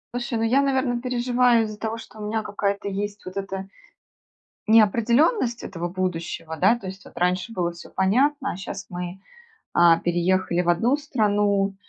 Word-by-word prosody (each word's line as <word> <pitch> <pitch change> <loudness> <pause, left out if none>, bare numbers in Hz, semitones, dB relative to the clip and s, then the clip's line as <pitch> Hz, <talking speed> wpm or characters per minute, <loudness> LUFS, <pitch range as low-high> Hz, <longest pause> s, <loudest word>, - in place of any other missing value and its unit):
Слушай, 240 -1 -2
ну, 225 - -1
я, 250 +5 +3
наверно, 260 -3 0
переживаю 245 -1 +2
из-за 215 -1 -8
того, 225 0 -3
что 220 -1 -12
у 210 - -5
меня 220 0 -1
какая-то 200 -1 -2
есть 205 +1 -4
вот 185 - -8
эта 195 -1 -4 1.0
неопределенность 235 - +3
этого 175 -2 -4
будущего, 170 -3 -4
да, 195 +8 +4
то 200 -5 -8
есть 190 0 -9
вот - - -16
раньше 180 +5 0
было 175 -5 -1
всё 170 0 -12
понятно, 265 +9 +1
а - - -7
щас 195 0 -7
мы, 180 +1 -6 0.5
а, 170 -1 +6
переехали 175 +1 +1
в 175 - -1
одну 225 +10 +3
страну, 205 -8 +1
205 Hz, 165 wpm, -24 LUFS, 185-240 Hz, 1.0 s, а